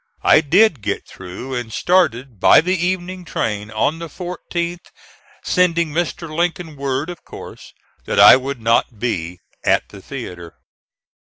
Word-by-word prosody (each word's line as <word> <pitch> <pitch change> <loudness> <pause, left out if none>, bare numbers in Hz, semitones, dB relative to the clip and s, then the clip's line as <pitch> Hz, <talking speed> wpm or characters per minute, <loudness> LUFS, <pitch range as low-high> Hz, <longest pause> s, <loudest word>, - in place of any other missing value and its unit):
I 155 - +6
did 170 - +3
get 100 0 -3
through 95 +8 -8
and 120 -3 -4
started 130 - +1
by - - +7
the 180 +3 +1
evening 180 +1 -2
train 105 -9 -3
on 110 +9 -1
the 170 - -6
14th, 175 0 -5 0.6
sending 170 -3 +1
Mr. 165 +1 -2
Lincoln 170 -1 -2
word, 140 +3 -2
of 175 - -12
course, - - -11 0.3
that - - -1
I - - +10
would 135 0 -3
not 115 +1 +1
be 90 -6 -3 0.2
at - - +1
the - - -12
theatre. 85 -2 -8
150 Hz, 140 wpm, -19 LUFS, 115-175 Hz, 0.6 s, I